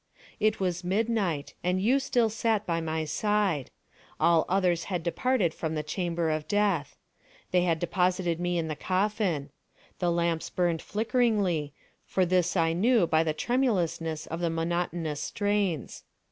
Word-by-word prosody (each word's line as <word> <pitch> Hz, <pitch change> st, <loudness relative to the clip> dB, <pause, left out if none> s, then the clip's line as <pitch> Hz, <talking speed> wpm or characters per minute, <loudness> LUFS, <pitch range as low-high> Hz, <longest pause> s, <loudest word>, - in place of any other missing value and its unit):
It 215 Hz, 0 st, +2 dB
was 180 Hz, -2 st, -1 dB
midnight; 195 Hz, -6 st, 0 dB
and 180 Hz, +1 st, +1 dB
you 245 Hz, +8 st, +3 dB
still 240 Hz, -4 st, +1 dB
sat 220 Hz, -1 st, 0 dB
by 165 Hz, -1 st, -1 dB
my 160 Hz, 0 st, -2 dB
side. 195 Hz, -3 st, 0 dB, 0.5 s
All 170 Hz, -2 st, +4 dB
others 180 Hz, -3 st, +1 dB
had 180 Hz, -4 st, -3 dB
departed 190 Hz, -1 st, +1 dB
from 160 Hz, -1 st, -3 dB
the 155 Hz, -, -2 dB
chamber 170 Hz, 0 st, -1 dB
of 155 Hz, 0 st, -2 dB
Death. 200 Hz, -7 st, 0 dB, 0.5 s
They 180 Hz, -1 st, +3 dB
had 165 Hz, -2 st, +2 dB
deposited 180 Hz, 0 st, 0 dB
me 175 Hz, 0 st, 0 dB
in 165 Hz, -1 st, -1 dB
the 155 Hz, -, -3 dB
coffin. 185 Hz, -6 st, -1 dB, 0.5 s
The 175 Hz, -, +1 dB
lamps 170 Hz, -1 st, 0 dB
burned 175 Hz, -3 st, 0 dB
flickeringly; 210 Hz, -, 0 dB, 0.3 s
for 185 Hz, -, +2 dB
this 180 Hz, +1 st, +1 dB
I 165 Hz, -1 st, +2 dB
knew 220 Hz, +3 st, +3 dB
by 160 Hz, -1 st, +3 dB
the 160 Hz, -1 st, +1 dB
tremulousness 170 Hz, -, 0 dB
of 165 Hz, -, -5 dB
the 170 Hz, -1 st, 0 dB
monotonous 165 Hz, -2 st, -2 dB
strains. 205 Hz, -, -1 dB
175 Hz, 150 wpm, -28 LUFS, 165-205 Hz, 0.5 s, All